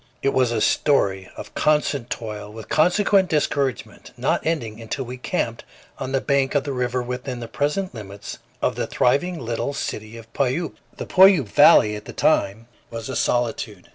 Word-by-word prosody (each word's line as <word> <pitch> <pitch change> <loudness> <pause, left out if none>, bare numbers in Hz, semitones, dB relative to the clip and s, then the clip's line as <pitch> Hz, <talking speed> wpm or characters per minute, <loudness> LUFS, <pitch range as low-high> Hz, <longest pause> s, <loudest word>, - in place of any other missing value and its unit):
It 135 - +3
was 130 -2 +2
a 115 -2 0
story 95 -11 +2
of - - -9
constant 150 -5 +1
toil 105 -2 -6
with 110 0 -10
consequent 190 +4 +3
discouragement, 140 -4 -1
not - - 0
ending 115 -9 -2
until 120 +4 -4
we 125 +1 -7
camped 125 - -3 0.4
on 130 - -4
the 135 - +2
bank 140 +1 +1
of 140 - +2
the 140 - -4
river 125 0 -1
within 125 +1 -5
the 120 - -6
present 150 +10 -2
limits 100 -3 -8 0.2
of - - +2
the - - -2
thriving 170 +8 +1
little 120 +2 -3
city 110 -2 -5
of 115 0 -14
Puyallup. 140 +5 -1 0.2
The - - -5
Puyallup 185 - +6
valley 105 +1 +6
at 105 - -9
that - - -10
time 100 +4 +1 0.2
was 115 +1 -6
a 130 - -4
solitude. 110 -5 -1
125 Hz, 175 wpm, -22 LUFS, 110-145 Hz, 0.4 s, Puyallup